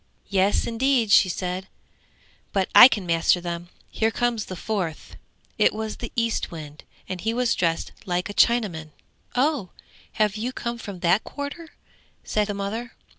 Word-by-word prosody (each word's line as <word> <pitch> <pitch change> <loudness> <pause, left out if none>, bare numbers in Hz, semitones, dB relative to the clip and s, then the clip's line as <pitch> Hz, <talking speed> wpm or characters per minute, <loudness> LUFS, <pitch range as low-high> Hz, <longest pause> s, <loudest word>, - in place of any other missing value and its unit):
'Yes, 195 0 +2
indeed,' 235 -1 +1
she 190 - +6
said; 180 +1 -3 0.9
'but 195 -2 +1
I 245 - +12
can 210 -7 -2
master 170 +1 +3
them! 175 0 -5 0.2
Here 220 - 0
comes 235 -1 -1
the 185 - -7
fourth.' 180 -4 -4 0.4
It - - +4
was 220 0 -4
the 235 - -6
Eastwind, 165 -10 -3 0.2
and 185 -1 -5
he 225 +1 -1
was 250 -1 +2
dressed 165 -2 -1 0.2
like 180 0 -1
a 205 - -6
Chinaman. 185 -11 +1 0.4
'Oh, 265 - +1 0.4
have 215 -1 +1
you 240 +4 -3
come 235 -1 -4
from 195 -5 -8
that 180 +4 +3
quarter?' 295 +3 -7 0.5
said 210 -1 0
the 205 - -3
mother. 220 +4 -4
205 Hz, 155 wpm, -24 LUFS, 180-235 Hz, 0.9 s, I